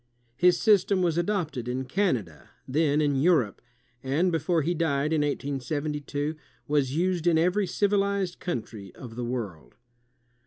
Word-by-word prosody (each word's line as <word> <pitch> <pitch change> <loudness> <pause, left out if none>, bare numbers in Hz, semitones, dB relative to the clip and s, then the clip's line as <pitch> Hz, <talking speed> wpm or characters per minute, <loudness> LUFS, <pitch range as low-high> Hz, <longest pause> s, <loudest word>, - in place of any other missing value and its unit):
His 175 +7 +4
system 200 -3 +3
was 170 -3 +1
adopted 170 - -2
in 130 +2 -2
Can 180 +2 +1
ada, 85 - -12 0.2
then 150 +2 +2
in 145 -2 +1
Europe, 140 - +2 0.4
and 150 +8 +1
before 165 0 +1
he 170 +4 0
died, 155 -2 0
in 155 - +2
1872, 145 +1 -2 0.3
was 140 -2 +1
used 175 0 0
in 165 -2 +4
every 180 +4 +2
civilized 200 -1 0
country 110 - -5
of 120 -3 -10
the 120 - -4
world. 115 -10 -5
150 Hz, 145 wpm, -27 LUFS, 130-180 Hz, 0.4 s, His